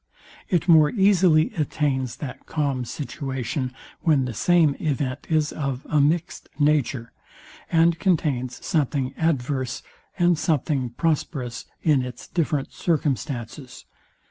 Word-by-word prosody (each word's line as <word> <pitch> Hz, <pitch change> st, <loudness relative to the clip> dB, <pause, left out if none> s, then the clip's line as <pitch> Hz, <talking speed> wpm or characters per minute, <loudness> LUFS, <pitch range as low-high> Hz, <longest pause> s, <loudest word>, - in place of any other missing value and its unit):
It 175 Hz, -1 st, +1 dB
more 155 Hz, -3 st, +7 dB
easily 190 Hz, -7 st, +4 dB
attains 140 Hz, -5 st, -1 dB
that 140 Hz, -4 st, -8 dB
calm 140 Hz, -5 st, -1 dB
situation, 130 Hz, 0 st, -4 dB, 0.3 s
when 145 Hz, -5 st, +2 dB
the 125 Hz, -, -4 dB
same 160 Hz, -, +3 dB
event 140 Hz, -3 st, -2 dB
is 155 Hz, -2 st, +1 dB
of 140 Hz, -3 st, -3 dB
a 150 Hz, -2 st, +3 dB
mixt 165 Hz, +5 st, 0 dB
nature, 145 Hz, -5 st, +1 dB, 0.6 s
and 165 Hz, 0 st, +4 dB
contains 140 Hz, -9 st, 0 dB
something 140 Hz, -5 st, 0 dB
adverse 130 Hz, -4 st, -1 dB, 0.3 s
and 175 Hz, -2 st, +3 dB
something 145 Hz, -5 st, 0 dB
prosperous 135 Hz, -3 st, -2 dB, 0.2 s
in 150 Hz, -5 st, +4 dB
its 125 Hz, -1 st, -7 dB
different 150 Hz, -5 st, -1 dB
circumstances. 135 Hz, -5 st, -2 dB
145 Hz, 115 wpm, -24 LUFS, 130-160 Hz, 0.6 s, more